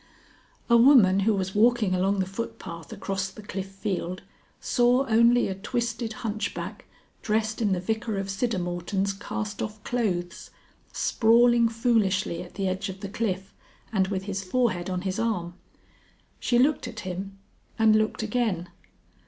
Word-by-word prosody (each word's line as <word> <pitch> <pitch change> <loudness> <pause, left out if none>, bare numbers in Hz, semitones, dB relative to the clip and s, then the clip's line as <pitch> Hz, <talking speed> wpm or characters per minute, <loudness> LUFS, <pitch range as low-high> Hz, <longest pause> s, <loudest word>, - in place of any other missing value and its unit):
A 235 - +6
woman 230 -7 +6
who 215 +3 +3
was 190 -1 -2
walking 220 -2 +3
along 190 +2 +1
the - - 0
footpath 185 -5 -7
across 195 -1 -3
the 210 +3 -12
Cliff 195 -1 -5
Field 190 -2 -4 0.4
saw 245 +2 +3
only 235 +1 +4
a 190 - -2
twisted 230 +3 -3
hunchback 210 -2 -4 0.4
dressed 220 +1 -1
in 210 -3 +2
the 185 - +1
Vicar 220 +3 -2
of 195 - -2
Siddermorton's 195 -2 -1
cast 205 +1 -5
off 215 -1 -5
clothes, 180 -8 -2 0.4
sprawling 235 0 +4
foolishly 215 -7 +1
at 175 - -11
the 195 -1 -1
edge 185 +2 -2
of 190 +1 -8
the 200 - -5
cliff 190 -3 -3 0.4
and 190 -2 +2
with 190 -1 -2
his 195 -1 -4
forehead 190 -3 0
on 180 -1 -2
his 190 +2 -3
arm. 195 -7 -1 0.9
She 240 - +1
looked 270 +1 +2
at 230 -2 -7
him 190 +2 -6 0.4
and 220 -1 +5
looked 215 +1 +1
again. 215 -6 -1
205 Hz, 150 wpm, -26 LUFS, 190-230 Hz, 0.9 s, A